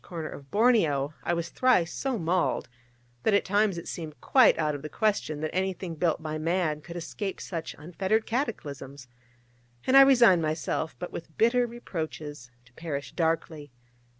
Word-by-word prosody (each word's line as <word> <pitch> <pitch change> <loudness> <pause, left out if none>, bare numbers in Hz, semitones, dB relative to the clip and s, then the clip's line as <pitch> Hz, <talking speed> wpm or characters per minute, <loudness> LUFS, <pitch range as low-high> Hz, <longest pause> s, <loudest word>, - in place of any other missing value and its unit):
corner 165 -4 -6
of 140 -1 -11
Borneo 165 - +2
I 175 - 0
was 170 0 -3
thrice 235 -10 +2
so 265 -3 -2
mauled, 170 -5 0 0.5
that 210 - +3
at 200 - +2
times 205 -1 +2
it 170 - -7
seemed 155 -3 -6
quite 260 -3 +5
out 155 -2 0
of 145 - -5
the 155 - -6
question 200 -8 -1
that 155 - -3
anything 185 -2 -2
built 165 0 0
by 155 0 -3
man 165 -2 0
could 170 +2 -10
escape 190 +3 -5
such 165 -3 -5
unfettered 190 +7 -1
cataclysms, 140 - -4 0.8
and 260 - +3
I 275 - +11
resigned 240 -10 +6
myself, 155 0 -2
but 180 - -6
with 160 -2 -9
bitter 240 +2 +3
reproaches, 155 - -6 0.2
to 125 - -24
perish 145 -2 -5
darkly. 160 -3 -1
170 Hz, 165 wpm, -27 LUFS, 155-205 Hz, 0.8 s, I